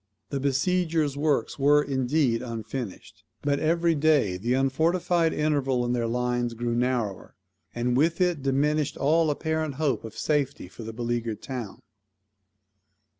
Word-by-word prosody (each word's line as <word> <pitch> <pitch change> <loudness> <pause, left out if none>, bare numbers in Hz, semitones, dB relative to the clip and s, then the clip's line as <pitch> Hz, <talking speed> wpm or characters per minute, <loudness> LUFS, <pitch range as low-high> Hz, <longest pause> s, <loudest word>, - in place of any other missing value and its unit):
The 140 - -1
besiegers' 155 +2 +1
works 145 -3 0
were, 145 +2 +5
indeed, 130 -2 +1
unfinished; 115 -2 -6 0.2
but 140 0 +1
every 170 +1 +2
day 145 - +2
the 115 +7 0
unfortified 165 +5 +2
interval 135 -5 0
in 120 - 0
their 120 -2 0
lines 120 0 -1
grew 120 +1 -2
narrower, 120 -5 -1 0.4
and 120 +1 0
with 165 +6 +2
it 175 -5 +1
diminished 145 +2 +1
all 160 +3 +3
apparent 160 -1 -1
hope 140 -6 0
of 115 -1 -9
safety 145 -9 -1
for 95 - -12
the 115 0 -6
beleaguered 115 -1 -3
town. 125 -7 -6
135 Hz, 135 wpm, -26 LUFS, 120-155 Hz, 0.4 s, were